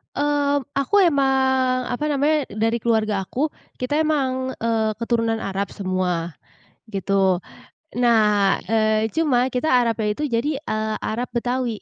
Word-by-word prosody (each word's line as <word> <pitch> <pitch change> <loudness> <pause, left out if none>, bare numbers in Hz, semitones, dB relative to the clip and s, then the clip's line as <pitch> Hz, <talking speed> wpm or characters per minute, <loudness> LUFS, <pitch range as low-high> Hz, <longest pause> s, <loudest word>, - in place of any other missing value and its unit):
Eee, 285 0 +1 0.2
aku 280 +9 +2
emang 265 -3 +2
apa 245 +4 -3
namanya, 295 +2 +2
dari 225 +2 -1
keluarga 215 -4 +1
aku, 265 +10 -1 0.3
kita 250 +3 -1
emang, 260 -4 0
eee, 225 -1 0
keturunan 230 -1 0
Arab 195 0 -3
semua, 180 -4 -2 0.5
gitu. 195 -2 +1 0.6
Nah, 210 -5 +3
eee, 220 0 +2
cuma 260 -6 +2
kita 250 +3 -2
Arabnya 230 -4 +2
itu 295 +6 -3
jadi, 270 +5 -1
eee, 215 -6 -2
Arab 240 +2 -3
Betawi. 245 -2 -2
235 Hz, 125 wpm, -22 LUFS, 215-265 Hz, 0.6 s, Nah